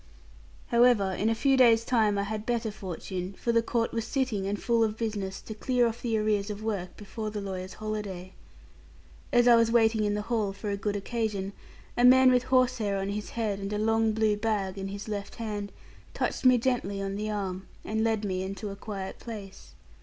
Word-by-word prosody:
However, 235 Hz, -5 st, +4 dB
in 205 Hz, +4 st, 0 dB
a 225 Hz, -, +1 dB
few 270 Hz, +4 st, +3 dB
days' 230 Hz, -3 st, +5 dB
time, 215 Hz, -4 st, +2 dB
I 200 Hz, -, +1 dB
had 210 Hz, +1 st, -4 dB
better 235 Hz, -1 st, -1 dB
fortune; 185 Hz, -1 st, -5 dB
for 235 Hz, -, 0 dB
the 230 Hz, 0 st, +4 dB
court 230 Hz, 0 st, -1 dB
was 230 Hz, -1 st, -1 dB
sitting 235 Hz, -7 st, -1 dB
and 205 Hz, 0 st, -2 dB
full 230 Hz, -1 st, +2 dB
of 215 Hz, -1 st, -1 dB
business, 205 Hz, -4 st, -3 dB
to 220 Hz, -, -7 dB
clear 245 Hz, +3 st, +1 dB
off 230 Hz, +1 st, -2 dB
the 230 Hz, -2 st, 0 dB
arrears 210 Hz, -1 st, +1 dB
of 210 Hz, 0 st, -5 dB
work, 200 Hz, -5 st, -3 dB
before 215 Hz, +1 st, -5 dB
the 210 Hz, 0 st, -4 dB
lawyers' 185 Hz, -2 st, -5 dB
holiday. 205 Hz, -4 st, -5 dB, 1.0 s
As 240 Hz, -2 st, +4 dB
I 240 Hz, -, +8 dB
was 230 Hz, -1 st, +4 dB
waiting 225 Hz, -2 st, +4 dB
in 205 Hz, 0 st, +1 dB
the 210 Hz, -, -2 dB
hall 215 Hz, -3 st, -1 dB
for 205 Hz, +1 st, -4 dB
a -, -, 0 dB
good 205 Hz, 0 st, -2 dB
occasion, 205 Hz, -2 st, -2 dB, 0.4 s
a 240 Hz, -, +1 dB
man 260 Hz, +1 st, +8 dB
with 250 Hz, 0 st, +3 dB
horsehair 255 Hz, -6 st, +2 dB
on 195 Hz, 0 st, -2 dB
his 205 Hz, +1 st, -4 dB
head, 210 Hz, -4 st, -1 dB
and 195 Hz, +1 st, -4 dB
a 210 Hz, -, -1 dB
long 225 Hz, +1 st, +2 dB
blue 215 Hz, -1 st, +2 dB
bag 205 Hz, -3 st, -1 dB
in 195 Hz, -1 st, -4 dB
his 200 Hz, +2 st, -6 dB
left 205 Hz, -2 st, -5 dB
hand, 210 Hz, -3 st, -4 dB, 0.4 s
touched -, -, -2 dB
me 255 Hz, -1 st, +7 dB
gently 235 Hz, -5 st, -1 dB
on 195 Hz, 0 st, -3 dB
the 210 Hz, +1 st, -3 dB
arm, 195 Hz, -3 st, -3 dB, 0.2 s
and 220 Hz, +1 st, 0 dB
led 220 Hz, -2 st, +1 dB
me 185 Hz, -2 st, -1 dB
into 195 Hz, +2 st, -5 dB
a -, -, -6 dB
quiet 200 Hz, -2 st, -6 dB
place. 205 Hz, -5 st, -9 dB
215 Hz, 210 wpm, -28 LUFS, 200-230 Hz, 1.0 s, I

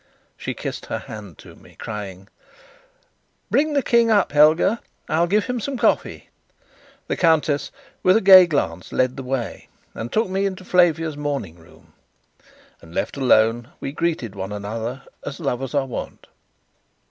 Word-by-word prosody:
She -, -, -5 dB
kissed -, -, -6 dB
her -, -, -2 dB
hand 105 Hz, -7 st, -10 dB
to -, -, -14 dB
me, -, -, -19 dB
crying: 100 Hz, -3 st, -7 dB, 1.2 s
"Bring 300 Hz, +2 st, +2 dB
the 280 Hz, -2 st, +1 dB
King 235 Hz, -1 st, +3 dB
up, 205 Hz, -4 st, +3 dB
Helga; 155 Hz, +9 st, +4 dB, 0.3 s
I'll 170 Hz, +2 st, +1 dB
give 205 Hz, +3 st, +2 dB
him 250 Hz, -1 st, -2 dB
some 270 Hz, +4 st, -4 dB
coffee." -, -, 0 dB, 0.8 s
The -, -, -1 dB
countess, 160 Hz, -4 st, +2 dB, 0.3 s
with 185 Hz, +3 st, +5 dB
a -, -, +1 dB
gay 190 Hz, -2 st, +9 dB
glance, 90 Hz, -, -2 dB
led 130 Hz, 0 st, +1 dB
the -, -, -6 dB
way, 130 Hz, -2 st, -4 dB, 0.3 s
and 115 Hz, +1 st, -6 dB
took 220 Hz, 0 st, +1 dB
me 195 Hz, +1 st, 0 dB
into 190 Hz, -1 st, -7 dB
Flavia's 165 Hz, -4 st, +2 dB
morning 140 Hz, -, -4 dB
room. 80 Hz, -1 st, -20 dB, 0.9 s
And, 80 Hz, +1 st, -14 dB
left -, -, -2 dB
alone, 120 Hz, -3 st, +3 dB
we -, -, -4 dB
greeted 155 Hz, -, -2 dB
one 95 Hz, 0 st, -6 dB
another 110 Hz, +5 st, -5 dB, 0.2 s
as 140 Hz, -, -6 dB
lovers 135 Hz, -3 st, -3 dB
are 140 Hz, -1 st, +2 dB
wont. 130 Hz, -, -7 dB
145 Hz, 155 wpm, -22 LUFS, 110-185 Hz, 1.2 s, gay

